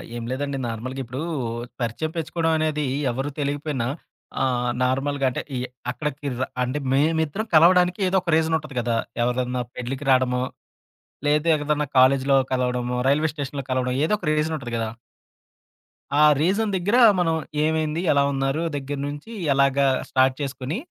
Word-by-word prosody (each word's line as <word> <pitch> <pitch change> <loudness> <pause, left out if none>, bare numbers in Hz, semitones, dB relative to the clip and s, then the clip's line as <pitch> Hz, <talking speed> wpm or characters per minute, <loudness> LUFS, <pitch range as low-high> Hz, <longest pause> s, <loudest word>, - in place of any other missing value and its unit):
ఏం 120 - -5
లేదండి 140 +1 -2
నార్మల్‌గా 120 +4 -5
ఇప్పుడు 125 +3 -6 0.6
పరిచయం 120 +7 -2
పెచ్చుకోవడం 165 +1 0
అనేది 155 -1 0 0.3
ఎవరు 135 +4 -3
తెలికిపోయినా. 145 -3 -2 0.6
ఆహ్, 125 -2 0
నార్మల్‌గా 135 +2 0
అంటే 125 - -3 0.2
ఈ - - -1 0.3
అక్కడికి 145 +2 -4
ర 130 - +1 0.2
అంటే 130 +4 -2
మేమిద్దరం 160 +7 +1
కలవడానికి 180 +3 +5
ఏదో 190 +1 +2
ఒక 170 -3 -1
రీజన్ 160 0 +2
ఉంటది 150 -4 -10
కదా! 120 -1 0 0.3
ఎవరిదన్నా 125 +1 0
పెళ్ళికి 130 +3 -5
రాడమో. 125 -1 +2 0.8
లేదు 150 +2 +2
ఎదన్నా 150 0 -1
కాలేజీలో 135 +1 +5 0.2
కలవడమో, 125 -1 0
రైల్వే 150 +3 +2
స్టేషన్‌లో 140 -2 -4
కలవడం. 125 0 0
ఏదో 185 - +2
ఒక - - -8
రీజన్ 155 +1 0
ఉంటది 120 -3 -7
కదా! 115 -1 -1 1.3
ఆ - - +7 0.2
రీజన్ 200 +5 +1
దగ్గర 200 +6 +1 0.2
మనం 165 -2 +2 0.3
ఏమైంది? 160 0 0
ఎలా 140 -1 +4
ఉన్నారు? 135 +4 0
దగ్గర 140 0 -4
నుంచి 145 +9 -7 0.2
ఎలాగా 140 0 +3 0.2
స్టార్ట్ 130 0 +3
చేసుకొని? 135 +3 -3
140 Hz, 145 wpm, -23 LUFS, 130-155 Hz, 1.3 s, ఆ